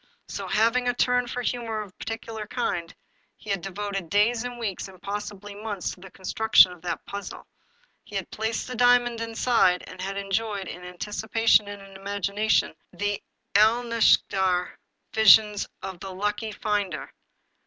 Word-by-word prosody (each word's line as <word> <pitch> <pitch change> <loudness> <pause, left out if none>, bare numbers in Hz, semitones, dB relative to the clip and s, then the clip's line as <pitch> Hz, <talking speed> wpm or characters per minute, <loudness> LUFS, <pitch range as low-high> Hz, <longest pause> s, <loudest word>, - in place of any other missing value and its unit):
So, - - -5
having 230 +3 +2
a 245 - 0
turn 250 0 +2
for 245 0 -4
humor 230 -3 -2
of 205 -3 -9
a - - -11
peculiar 225 -1 -5
kind, 170 -3 -2 0.5
he 210 - -7
had 195 -3 0
devoted 195 -1 -4
days, 225 +3 +3
and 245 0 -5
weeks, 210 -6 -3
and 190 -1 -14
possibly 205 +1 -6
months, 205 -2 -4
to - - -11
the 190 +1 -11
construction 190 +1 +4
of 180 -2 -12
that 175 -1 -4
puzzle. 200 0 -7 0.6
He 205 - -12
had 195 -2 -3
placed 220 +1 -2
the 255 - -6
diamond 245 -1 +3
inside, 225 -5 +2
and 185 - -10
he 190 - -3
had 195 0 -4
enjoyed, 200 0 -2
in 180 - -7
anticipation 210 +4 +1
and 205 -1 -8
in 195 0 -14
imagination, 200 +2 0 0.2
the 205 0 -2 0.3
Alnaschar 215 -5 +3 0.3
visions 215 -1 +6 0.2
of 190 -2 -6
the 195 - -7
lucky 210 +3 -2
finder. 205 -5 -2
205 Hz, 160 wpm, -26 LUFS, 195-225 Hz, 0.6 s, visions